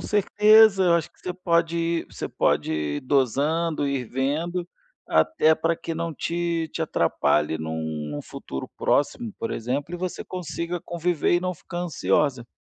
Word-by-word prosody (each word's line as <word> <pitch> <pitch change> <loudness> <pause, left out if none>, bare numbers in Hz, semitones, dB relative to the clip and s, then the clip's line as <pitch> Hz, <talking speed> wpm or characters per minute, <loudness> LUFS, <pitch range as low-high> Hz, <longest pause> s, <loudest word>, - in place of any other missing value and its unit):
certeza. 210 0 +5
Eu 170 - +5
acho 170 - 0
que - - -32
você 180 - -4
pode 170 -2 +1
ir 165 0 -1
você - - -5
pode - - +1
ir 75 -1 -2
dosando, 145 +4 +1
ir 140 -2 -1
vendo. 155 +9 -2 0.4
Até 160 - +4
pra 165 +1 0
que 165 - -5
não 165 0 -3
te 170 +1 -2
te 165 - -2
atrapalhe 75 - +1
em 80 0 -4
um 80 -1 -4
em - - -5
um - - -4
futuro 65 - -7
próximo, 220 - 0
por 230 - -3
exemplo, 140 +8 -3
e - - -2
você 180 0 -4
consiga 175 -1 -4
conviver 175 -1 0
e 175 - +3
não 180 0 -2
ficar 175 +2 -8
ansiosa. 150 -7 0
165 Hz, 170 wpm, -25 LUFS, 135-175 Hz, 0.4 s, certeza